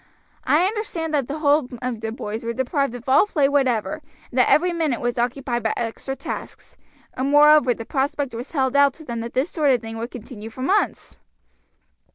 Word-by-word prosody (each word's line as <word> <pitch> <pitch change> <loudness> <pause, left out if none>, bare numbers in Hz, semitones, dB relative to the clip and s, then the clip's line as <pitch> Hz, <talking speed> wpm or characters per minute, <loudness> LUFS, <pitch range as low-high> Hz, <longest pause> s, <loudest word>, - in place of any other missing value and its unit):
I 320 +5 +4
understand 380 -6 -3
that 280 -5 +1
the 290 - -4
whole 295 -2 +3
of 250 -3 -4
the 225 -1 -3
boys 220 0 -5
were 230 0 -2
deprived 260 0 -1
of 245 +1 -10
all 265 +10 +5
play 295 -8 +2
whatever, 275 +1 0 0.3
and 255 - -1
that 250 - +4
every 350 +3 +3
minute 315 -8 0
was 240 0 -2
occupied 240 0 -1
by 220 - 0
extra 240 +3 -4
tasks, - - -8 0.4
and 260 +2 -2
moreover 290 -3 +6
the 225 - -8
prospect 275 0 -1
was 240 +6 -7
held 265 -3 0
out 280 -1 +5
to 315 - -13
them 235 -3 -4
that 230 +1 -6
this 265 +6 0
sort 300 -4 +1
of 250 -3 +3
thing 225 0 -7
would 230 +1 -4
continue 225 -3 -9
for 255 +3 -7
months." 395 +9 0
265 Hz, 205 wpm, -22 LUFS, 235-295 Hz, 0.4 s, moreover